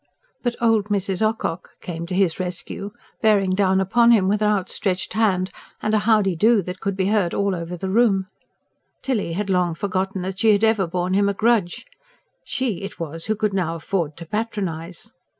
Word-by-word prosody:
But 240 Hz, -2 st, -1 dB
"old 225 Hz, -3 st, +3 dB
Mrs. 200 Hz, -2 st, -1 dB
Ocock" 215 Hz, -6 st, -2 dB
came 170 Hz, -1 st, -6 dB
to 180 Hz, -, -3 dB
his 185 Hz, -3 st, +2 dB
rescue, 185 Hz, +2 st, -5 dB, 0.3 s
bearing 205 Hz, -4 st, +3 dB
down 190 Hz, 0 st, +2 dB
upon 235 Hz, +5 st, +4 dB
him 210 Hz, -5 st, +5 dB
with 210 Hz, +2 st, +1 dB
an 210 Hz, -, +3 dB
outstretched 190 Hz, -2 st, -1 dB
hand, 195 Hz, -4 st, +1 dB, 0.3 s
and 215 Hz, -, -1 dB
a 215 Hz, -, +4 dB
howdee 205 Hz, -5 st, +2 dB
do 220 Hz, -1 st, +4 dB
that 180 Hz, +2 st, -6 dB
could 195 Hz, -1 st, -3 dB
be 190 Hz, 0 st, +1 dB
heard 205 Hz, -5 st, +1 dB
all 200 Hz, -1 st, +1 dB
over 175 Hz, 0 st, -5 dB
the 190 Hz, -, -4 dB
room: 200 Hz, -3 st, +3 dB, 0.8 s
Tilly 220 Hz, -10 st, -1 dB
had 195 Hz, +2 st, -2 dB
long 180 Hz, -3 st, +1 dB
forgotten 190 Hz, +1 st, -2 dB
that 190 Hz, 0 st, -4 dB
she 220 Hz, -2 st, +5 dB
had 205 Hz, +1 st, +1 dB
ever 220 Hz, -4 st, +3 dB
borne 180 Hz, +2 st, -1 dB
him 200 Hz, +1 st, +3 dB
a 200 Hz, -, -2 dB
grudge; 215 Hz, -5 st, +1 dB, 0.6 s
she 250 Hz, -9 st, -2 dB
it 195 Hz, -, -7 dB
was 165 Hz, 0 st, -4 dB
who 215 Hz, -, 0 dB
could 210 Hz, -1 st, -1 dB
now 175 Hz, -4 st, -1 dB
afford 165 Hz, -2 st, -2 dB
to 170 Hz, -, -8 dB
patronise. 190 Hz, -2 st, -4 dB
195 Hz, 190 wpm, -22 LUFS, 180-215 Hz, 0.8 s, him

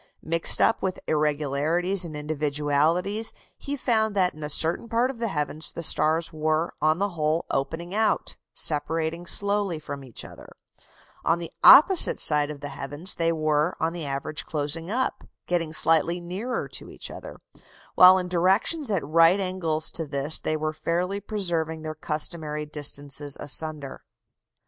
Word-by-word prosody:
Mixed 165 Hz, +1 st, +1 dB
up 225 Hz, -, +2 dB
with 185 Hz, -1 st, -3 dB
irregularities 155 Hz, +5 st, 0 dB
and 155 Hz, -3 st, -7 dB
individualities, 150 Hz, +7 st, 0 dB, 0.2 s
he 285 Hz, -, -5 dB
found 220 Hz, -5 st, 0 dB
that 185 Hz, -2 st, +2 dB
in 155 Hz, -, -13 dB
a 150 Hz, -, -4 dB
certain 165 Hz, +9 st, +1 dB
part 235 Hz, +3 st, +1 dB
of 245 Hz, -, -13 dB
the 230 Hz, -, -1 dB
heavens 155 Hz, -3 st, -2 dB
the 170 Hz, -, -5 dB
stars 160 Hz, +1 st, +2 dB
were 155 Hz, +1 st, -1 dB
on 155 Hz, +1 st, +2 dB
the 200 Hz, +2 st, -1 dB
whole 160 Hz, -2 st, -1 dB
opening 160 Hz, +6 st, -3 dB
out 220 Hz, +1 st, 0 dB, 0.2 s
separating 160 Hz, +3 st, 0 dB
slowly 200 Hz, -3 st, +1 dB
from 145 Hz, -2 st, -8 dB
each 125 Hz, -4 st, -10 dB
other; -, -, -13 dB, 0.8 s
on 165 Hz, -, +2 dB
the 170 Hz, -1 st, -7 dB
opposite 345 Hz, +5 st, +8 dB
side 150 Hz, -1 st, +2 dB
of 145 Hz, -2 st, -8 dB
the 145 Hz, -, -6 dB
heavens 145 Hz, +8 st, -4 dB
they 165 Hz, 0 st, 0 dB
were 155 Hz, +1 st, 0 dB
on 165 Hz, +1 st, -1 dB
the 165 Hz, -4 st, -5 dB
average 140 Hz, +2 st, -2 dB
closing 155 Hz, +3 st, -3 dB
up 255 Hz, +4 st, -2 dB, 0.2 s
getting 170 Hz, -3 st, -1 dB
slightly 165 Hz, +2 st, +2 dB
nearer 190 Hz, +9 st, -4 dB
to -, -, -8 dB
each -, -, -8 dB
other; -, -, -10 dB, 0.6 s
while 185 Hz, +1 st, +8 dB
in 180 Hz, -1 st, -3 dB
directions 190 Hz, -, +1 dB
at 195 Hz, -8 st, -1 dB
right 165 Hz, +5 st, +4 dB
angles 180 Hz, -5 st, -1 dB
to 165 Hz, -2 st, -5 dB
this 140 Hz, +2 st, -1 dB
they 155 Hz, -, -2 dB
were 155 Hz, 0 st, -3 dB
fairly 180 Hz, +5 st, -2 dB
preserving 170 Hz, -6 st, -2 dB
their 155 Hz, 0 st, -5 dB
customary 150 Hz, 0 st, -2 dB
distances 145 Hz, -1 st, -3 dB
asunder. 150 Hz, -2 st, 0 dB
160 Hz, 160 wpm, -25 LUFS, 150-185 Hz, 0.8 s, opposite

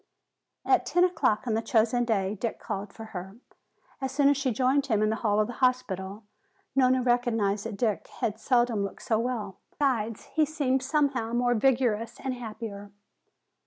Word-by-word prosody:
At -, -, +4 dB
ten 355 Hz, -, +2 dB
o'clock 295 Hz, -11 st, +1 dB
on 230 Hz, -, 0 dB
the 220 Hz, -, +1 dB
chosen 235 Hz, 0 st, +2 dB
day 200 Hz, -4 st, 0 dB
Dick 220 Hz, +2 st, -3 dB
called 195 Hz, +1 st, -5 dB
for 225 Hz, -, -10 dB
her. 190 Hz, +3 st, -7 dB, 0.6 s
As 265 Hz, -1 st, -2 dB
soon 280 Hz, +1 st, +4 dB
as 285 Hz, -, +4 dB
she 275 Hz, -1 st, 0 dB
joined 265 Hz, +4 st, +2 dB
him 215 Hz, -4 st, +2 dB
in 215 Hz, -, +2 dB
the 220 Hz, -, -1 dB
hall 210 Hz, -2 st, +1 dB
of 215 Hz, -, +3 dB
the 245 Hz, -, -6 dB
hospital, 215 Hz, -6 st, 0 dB, 0.5 s
Nona 255 Hz, -1 st, +4 dB
recognized 225 Hz, -4 st, +1 dB
that 215 Hz, -3 st, -6 dB
Dick 215 Hz, -2 st, -1 dB
had 215 Hz, 0 st, -1 dB
seldom 240 Hz, -5 st, +2 dB
looked 200 Hz, -, -6 dB
so 220 Hz, -2 st, +1 dB
well. 225 Hz, -5 st, -3 dB, 0.2 s
Besides, 230 Hz, -6 st, 0 dB
he 315 Hz, -, +3 dB
seemed 285 Hz, -4 st, 0 dB
somehow 270 Hz, -4 st, 0 dB
more 245 Hz, 0 st, +2 dB
vigorous 235 Hz, -2 st, +1 dB
and 265 Hz, -1 st, -3 dB
happier. 220 Hz, -4 st, -7 dB
235 Hz, 175 wpm, -28 LUFS, 215-260 Hz, 0.6 s, At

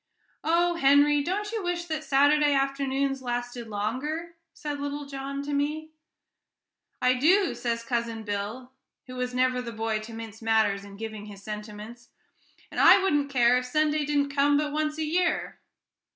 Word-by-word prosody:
"Oh, 340 Hz, +2 st, +2 dB
Henry, 285 Hz, 0 st, +5 dB
don't 405 Hz, +7 st, -2 dB
you 450 Hz, -2 st, -2 dB
wish 350 Hz, -1 st, -2 dB
that 315 Hz, -2 st, -3 dB
Saturday 290 Hz, +1 st, +4 dB
afternoons 275 Hz, 0 st, 0 dB
lasted 245 Hz, -1 st, -4 dB
longer?" 260 Hz, +11 st, -3 dB, 0.2 s
said 295 Hz, -2 st, -5 dB
little 285 Hz, 0 st, -4 dB
John 275 Hz, 0 st, -5 dB
to 290 Hz, 0 st, -4 dB
me. 305 Hz, +2 st, -2 dB, 1.1 s
"I 250 Hz, 0 st, +3 dB
do," 350 Hz, +9 st, +3 dB
says 235 Hz, -1 st, -2 dB
Cousin 235 Hz, -2 st, -2 dB
Bill, 210 Hz, +5 st, -4 dB, 0.3 s
who 255 Hz, -, -10 dB
was 250 Hz, 0 st, -3 dB
never 255 Hz, 0 st, +2 dB
the 235 Hz, -1 st, -6 dB
boy 225 Hz, -1 st, -2 dB
to 215 Hz, +2 st, -9 dB
mince 225 Hz, -1 st, -8 dB
matters 220 Hz, -3 st, +2 dB
in 200 Hz, 0 st, -11 dB
giving 215 Hz, -1 st, -7 dB
his 200 Hz, -1 st, -11 dB
sentiments; 215 Hz, +3 st, -8 dB, 0.6 s
"and -, -, -4 dB
I -, -, +8 dB
wouldn't 295 Hz, -7 st, +1 dB
care 250 Hz, -2 st, +4 dB
if 250 Hz, -, -6 dB
Sunday 305 Hz, +2 st, +1 dB
didn't 285 Hz, -1 st, 0 dB
come 285 Hz, +1 st, +3 dB
but 295 Hz, 0 st, -1 dB
once 305 Hz, 0 st, -1 dB
a 315 Hz, -, -1 dB
year." 345 Hz, +3 st, 0 dB
275 Hz, 165 wpm, -27 LUFS, 230-300 Hz, 1.1 s, I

